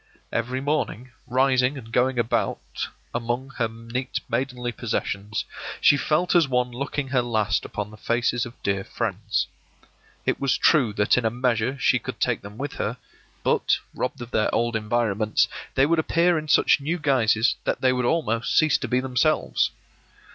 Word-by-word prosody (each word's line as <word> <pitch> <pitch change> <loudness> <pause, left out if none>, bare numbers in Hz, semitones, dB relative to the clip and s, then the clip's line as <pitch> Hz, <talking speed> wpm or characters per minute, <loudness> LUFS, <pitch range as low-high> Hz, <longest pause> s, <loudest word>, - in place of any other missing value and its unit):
Every 125 +3 -1
morning, 135 -4 -2 0.2
rising 130 +1 +2
and 115 -3 -10
going 125 +2 +2
about 120 -1 -1 0.3
among 120 +3 -2
her 115 - +2
neat 115 +3 -4
maidenly 125 0 -2
possessions, 105 -3 -3 0.3
she - - +6
felt 155 +5 +1
as 170 -5 +5
one 125 -1 0
looking 140 +2 -3
her 130 -2 +2
last 110 -3 0
upon 105 0 -5
the 110 - -12
faces 120 +1 0
of 120 +1 -9
dear 100 -1 0
friends. 105 +2 -2 0.8
It - - 0
was 140 -2 +2
true 135 -9 +4
that 105 +4 +3
in - - -4
a 110 - +3
measure 125 +1 0
she - - +3
could - - -7
take - - +1
them 100 +2 -11
with 140 +2 -4
her, - - -2 0.5
but, - - +2 0.2
robbed 125 0 -3
of 120 - -11
their 110 - +1
old 120 0 +1
environments, 110 -1 +1 0.3
they 135 - +5
would 165 +2 +2
appear 170 +2 +3
in 155 -1 -3
such 150 - +4
new 160 +5 -1
guises 125 -6 +3
that - - -1
they 130 -1 +4
would 125 -1 0
almost 120 -6 0
cease 155 -2 +4
to - - -3
be 125 0 +1
themselves. 130 +4 +1
125 Hz, 170 wpm, -24 LUFS, 115-135 Hz, 0.8 s, she